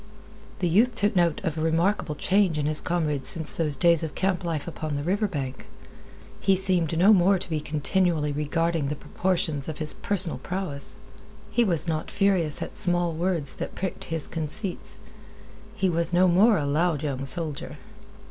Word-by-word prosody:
The 180 - +1
youth 220 +8 +2
took 205 -1 0
note 170 -3 +1
of 160 - -2
a 160 - -4
remarkable 165 +1 0
change 190 0 +1
in 145 - -1
his 155 0 -1
comrade 155 -5 -2
since 160 +3 +5
those 155 -3 +2
days 170 +2 +3
of 160 -2 -5
camp 190 -1 -1
life 165 -3 -3
upon 155 -3 -5
the 145 - -3
river 200 +6 0
bank. 135 -7 -6 0.7
He 195 - +2
seemed 180 -4 +1
no 195 +6 +6
more 190 0 +4
to 185 - -2
be 155 -1 -1
continually 155 +1 0
regarding 160 +1 -1
the 150 - -3
proportions 160 -4 -2
of 155 - -6
his 155 -1 -2
personal 190 -4 +1
prowess. 180 -7 -3 0.6
He 240 - +2
was 175 -6 0
not 155 -1 -3
furious 190 -7 +2
at - - -9
small 175 -2 0
words 165 -4 +1
that - - -6
pricked 190 0 -5
his 165 -2 -1
conceits. 170 +4 -4 0.8
He 195 -3 0
was 170 0 0
no 180 +1 +4
more 200 +5 +4
a 145 - -2
loud 155 +1 0
young 135 -3 -3
soldier. 150 0 0
170 Hz, 175 wpm, -25 LUFS, 150-185 Hz, 0.8 s, no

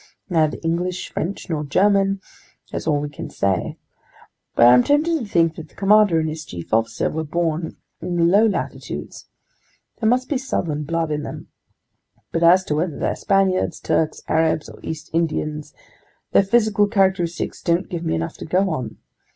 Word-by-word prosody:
Neither 160 -3 +2
English, 175 +2 -2
French, 185 +5 -4
nor 155 -3 -2
German, 195 +5 +2 0.5
that's - - -4
all 150 -2 +2
we 150 - -3
can 145 - -8
say. 95 -3 -1 0.8
But 120 - +6
I'm 125 +1 +8
tempted 310 - +2
to 240 - -5
think 165 -4 +2
that 160 -2 -9
the - - -25
commander 205 -4 +4
and 160 - -1
his 155 0 -5
chief 85 - -9
officer 115 +1 +1
were 160 +1 -2
born 160 +1 -2 0.2
in 175 - -3
the 170 - +2
low 200 +6 +5
latitudes. 205 - -5 0.7
There 220 - +2
must 255 +2 +1
be 275 -2 -1
southern 155 - -2
blood 165 0 -1
in 150 0 -1
them. - - -8 0.8
But 165 - -1
as 175 +3 +6
to 150 - -2
whether 160 -1 -1
they're - - -1
Spaniards, 195 -1 +1
Turks, 155 - -1
Arabs, 160 -1 +1
or - - -13
East 160 -1 -7
Indians, 155 -2 -1 0.6
their - - +6
physical 210 0 +2
characteristics 190 -5 0
don't 170 +3 +1
give 170 -1 -5
me 160 - 0
enough 165 0 -4
to - - -7
go 185 +3 +1
on. 125 -8 -4
170 Hz, 175 wpm, -21 LUFS, 155-195 Hz, 0.8 s, I'm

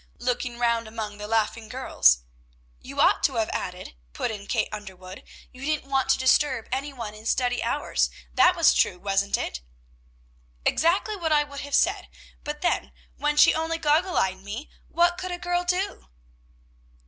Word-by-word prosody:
looking 245 0 -2
round 235 -1 +1
among 215 -2 -6
the 210 - -6
laughing 225 0 -1
girls. 60 - +3 0.6
"And - - -17
you - - -7
ought - - +4
to - - +1
have - - 0
added," - - -5 0.2
put - - -2
in 205 -2 -8
Kate - - 0
Underwood, 190 -3 -9 0.3
"you 255 - -13
didn't 305 -1 -1
want 265 -1 +1
to - - +5
disturb 260 -2 +2
any 275 +3 -2
one 230 -6 -7
in 215 +1 -9
study 245 0 +1
hours; - - 0 0.2
that 360 0 +5
was 335 -2 +5
true, 180 - +2
wasn't 195 +1 0
it?" 60 - -4 1.0
"Exactly 370 +6 +2
what 335 -5 -2
I 295 -1 +4
would 285 -1 -9
have 285 0 -2
said; - - +2 0.4
but 295 0 -5
then, 355 - 0 0.3
when 295 0 0
she - - +7
only 325 +1 -1
goggle 330 +4 +2
eyed 190 0 +1
me, 215 +9 -7 0.2
what 345 +1 +2
could 370 0 -4
a 355 - -3
girl 355 0 -1
do?" 360 +3 -2
260 Hz, 175 wpm, -25 LUFS, 215-315 Hz, 1.0 s, she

